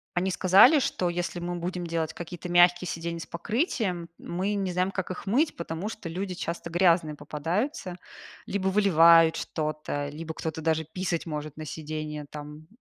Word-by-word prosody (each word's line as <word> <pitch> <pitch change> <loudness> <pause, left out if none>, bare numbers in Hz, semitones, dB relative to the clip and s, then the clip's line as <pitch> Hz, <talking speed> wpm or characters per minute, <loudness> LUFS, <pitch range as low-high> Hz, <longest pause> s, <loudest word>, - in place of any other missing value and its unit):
они 185 +1 +1
сказали, 195 - +6
что 180 -8 0
если 175 0 -3
мы 175 0 -3
будем 175 +1 -3
делать 165 -1 -2
какие-то 175 +1 -7
мягкие 175 0 +5
сиденья 170 0 -4
с - - -7
покрытием, 190 - -2
мы 190 +4 -2
не 190 -3 -1
знаем, 185 +1 +1
как 190 -1 -3
их 185 - -7
мыть, 275 +10 +2
потому 170 +4 -4
что 215 -6 -7
люди 185 +2 -3
часто 170 -1 -5
грязные 170 -3 +3
попадаются, 175 - -3 0.5
либо 190 -1 -1
выливают 165 -4 +6
что-то, 155 -2 -3
либо 160 +2 -6
кто-то 160 0 -4
даже 160 0 +1
писать 175 0 -3
может 150 -1 -5
на 155 - -6
сидение 155 -1 -5
там. 150 +1 -9
170 Hz, 165 wpm, -27 LUFS, 160-185 Hz, 0.5 s, сказали